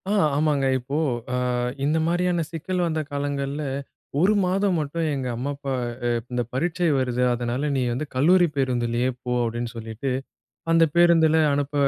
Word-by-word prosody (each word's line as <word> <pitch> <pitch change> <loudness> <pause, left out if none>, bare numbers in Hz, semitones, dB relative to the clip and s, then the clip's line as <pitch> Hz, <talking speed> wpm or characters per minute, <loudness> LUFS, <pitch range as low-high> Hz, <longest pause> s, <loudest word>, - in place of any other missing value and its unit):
ஆ, - - +1 0.2
ஆமாங்க. 145 -2 +2
இப்போ 135 +4 -4 0.4
அ, - - +1 0.5
இந்த 150 +3 +2
மாரியான 175 0 +1
சிக்கல் 180 +2 -2
வந்த 160 -2 -1
காலங்கள்ல 140 0 -2 0.6
1 190 +6 +4
மாதம் 190 0 +1
மட்டும் 155 +2 -2
எங்க 130 -2 -3
அம்மா, 130 +5 -3
அப்பா 140 -1 -4 0.3
அ, - - +2 0.2
இந்த 125 0 0
பரீட்சை 170 +5 0
வருது, 125 -1 -1
அதனால 120 +4 -2
நீ 135 - +1
வந்து 130 +6 -3
கல்லூரி 175 +7 +5
பேருந்திலே 125 -2 0
போ 125 - -2
அப்படின்னு 120 +1 -2
சொல்லிட்டு 115 +3 -5 0.6
அந்த 165 0 +6
பேருந்துல 165 -2 +5 0.2
அனுப்ப 145 0 -1
145 Hz, 150 wpm, -24 LUFS, 125-165 Hz, 0.6 s, அந்த